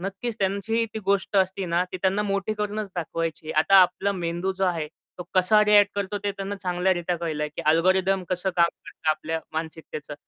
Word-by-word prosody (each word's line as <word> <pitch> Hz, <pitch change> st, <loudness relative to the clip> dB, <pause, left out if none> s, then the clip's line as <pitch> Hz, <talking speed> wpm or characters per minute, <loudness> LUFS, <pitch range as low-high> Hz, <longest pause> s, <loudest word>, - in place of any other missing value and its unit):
नक्कीच 200 Hz, +5 st, -4 dB
त्यांची 200 Hz, +4 st, 0 dB
ती 220 Hz, -, -2 dB
गोष्ट 200 Hz, +1 st, +1 dB
असते 190 Hz, 0 st, +1 dB
ना, 170 Hz, +1 st, +1 dB
ती 185 Hz, -, -7 dB
त्यांना 195 Hz, +2 st, +2 dB
मोठी 200 Hz, 0 st, -1 dB
करूनच 210 Hz, 0 st, -3 dB
दाखवायची. 165 Hz, -2 st, -3 dB
आता 160 Hz, +6 st, +3 dB
आपला 185 Hz, +2 st, 0 dB
मेंदू 175 Hz, 0 st, -2 dB
जो 195 Hz, -, +2 dB
आहे. 170 Hz, -4 st, 0 dB, 0.3 s
तो -, -, -4 dB
कसा 190 Hz, +3 st, +5 dB
रिएक्ट 205 Hz, -1 st, +5 dB
करतो 200 Hz, 0 st, -2 dB
ते 205 Hz, -, +1 dB
त्यांना 195 Hz, 0 st, -5 dB
चांगल्या 180 Hz, 0 st, 0 dB
रित्या 175 Hz, 0 st, -2 dB
कळलंय, 155 Hz, -3 st, -2 dB
की 150 Hz, -, -7 dB
अल्गोरिथम 185 Hz, +3 st, +2 dB
कसं 185 Hz, +1 st, -1 dB
काम 170 Hz, -1 st, +5 dB, 0.2 s
करतं 160 Hz, -, -6 dB
आपल्या 160 Hz, +1 st, -2 dB
मानसिकतेचं. 160 Hz, -2 st, -6 dB
185 Hz, 185 wpm, -25 LUFS, 170-200 Hz, 0.3 s, कसा